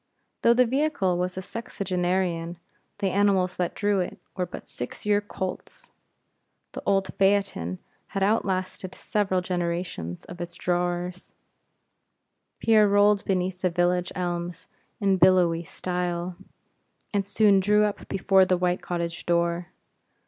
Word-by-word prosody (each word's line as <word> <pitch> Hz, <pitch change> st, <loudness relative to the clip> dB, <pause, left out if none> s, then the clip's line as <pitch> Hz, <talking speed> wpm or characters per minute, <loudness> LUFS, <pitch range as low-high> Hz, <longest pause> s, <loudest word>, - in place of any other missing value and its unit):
Though 235 Hz, -, +5 dB
the 250 Hz, +1 st, +5 dB
vehicle 265 Hz, -, +1 dB
was 180 Hz, +1 st, -2 dB
a -, -, -2 dB
sexagenarian, 180 Hz, -5 st, -2 dB, 0.4 s
the 195 Hz, -2 st, 0 dB
animals 190 Hz, -2 st, +2 dB
that 180 Hz, -1 st, -1 dB
drew 205 Hz, -2 st, +1 dB
it, 180 Hz, -, -3 dB, 0.2 s
were 180 Hz, -2 st, -1 dB
but -, -, -9 dB
six 120 Hz, -, -7 dB
year 205 Hz, 0 st, +3 dB
colts. 190 Hz, -2 st, -6 dB, 0.8 s
The -, -, -6 dB
old 195 Hz, -1 st, +1 dB
phaeton 195 Hz, -, +1 dB, 0.3 s
had 195 Hz, -1 st, -2 dB
outlasted 185 Hz, -2 st, -1 dB
several 195 Hz, -3 st, 0 dB
generations 170 Hz, -, -3 dB
of 175 Hz, 0 st, -9 dB
its 175 Hz, 0 st, -6 dB
drawers. 175 Hz, 0 st, -2 dB, 1.2 s
Pierre 215 Hz, -2 st, +5 dB
rolled 205 Hz, 0 st, +4 dB
beneath 185 Hz, -1 st, -1 dB
the 185 Hz, -, +2 dB
village 175 Hz, +1 st, +1 dB
elms 175 Hz, -1 st, -3 dB, 0.3 s
in 195 Hz, -3 st, +2 dB
billowy 175 Hz, -2 st, +4 dB
style, 180 Hz, 0 st, -3 dB, 0.8 s
and 200 Hz, -1 st, +2 dB
soon 200 Hz, 0 st, +4 dB
drew 210 Hz, +2 st, +4 dB
up 210 Hz, -1 st, -2 dB
before 195 Hz, 0 st, +4 dB
the 185 Hz, -1 st, +2 dB
white 180 Hz, 0 st, 0 dB
cottage 170 Hz, -1 st, -4 dB
door. 170 Hz, 0 st, +1 dB
185 Hz, 130 wpm, -26 LUFS, 175-200 Hz, 1.2 s, Though